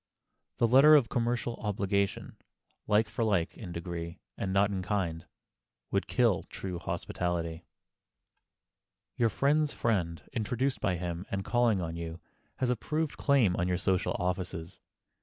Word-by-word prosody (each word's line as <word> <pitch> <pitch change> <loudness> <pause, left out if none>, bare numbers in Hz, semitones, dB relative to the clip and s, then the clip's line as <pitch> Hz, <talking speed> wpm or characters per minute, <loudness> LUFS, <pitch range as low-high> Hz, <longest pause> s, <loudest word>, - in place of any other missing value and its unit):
The 115 - +3
letter 135 +6 +8
of 135 -6 +4
commercial 120 0 -1
obligation, 100 -1 -1 0.5
like 105 +1 +3
for 110 +2 -2
like, 100 -7 +1
in 95 -6 -8
degree, 85 0 -5 0.2
and 95 - -3
not 100 +1 +3
in 95 -2 -2
kind, 90 -4 -2 0.6
would - - 0
kill - - +3
true 90 -3 -5
hospitality. 85 -1 -3 1.5
Your 115 -2 +3
friend's 145 +5 +2
friend, 90 -8 -1
introduced 125 +4 -1
by 95 -4 +1
him 85 +1 -4
and 95 -1 -3
calling 120 -5 +2
on 80 -1 -4
you, 85 0 -5 0.4
has 125 -1 0
a - - +2
proved 155 +5 -2
claim 130 -11 +3
on 85 - +1
your 90 -1 +1
social 90 0 +1
offices. 90 -1 -3
100 Hz, 140 wpm, -30 LUFS, 85-120 Hz, 1.5 s, letter